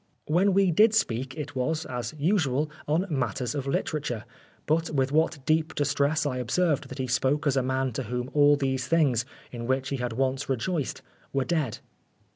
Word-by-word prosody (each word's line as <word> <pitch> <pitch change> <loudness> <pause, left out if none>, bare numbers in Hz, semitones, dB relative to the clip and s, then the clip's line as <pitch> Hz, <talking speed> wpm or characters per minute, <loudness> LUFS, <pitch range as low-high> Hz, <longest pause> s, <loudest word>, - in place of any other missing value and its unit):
When 185 +6 +3
we 195 -2 +4
did 215 +6 +5
speak, 130 - 0
it 145 -2 -5
was, 155 +5 -1
as 125 +2 -4
usual, 150 -3 +1 0.2
on 160 +5 +2
matters 125 - -1
of 140 -2 -3
literature, 135 -5 -2 0.4
but 160 +2 +1
with 135 -2 0
what 155 -2 +1
deep 155 0 +1
distress 145 +2 +1
I 130 -3 -1
observed 145 +5 0
that 130 - -8
he 130 - -1
spoke 130 +4 +1
as 140 -2 +2
a 135 - +3
man 130 0 0
to 130 - -3
whom 125 +3 -3
all 145 0 +6
these 130 -2 -1
things, 135 -8 +2 0.3
in 115 -1 -6
which 130 +1 0
he 140 - -1
had 125 -2 -3
once 135 +2 -1
rejoiced, 135 +4 -2 0.3
were 135 -1 +1
dead. 155 -10 -1
140 Hz, 185 wpm, -27 LUFS, 130-155 Hz, 0.4 s, all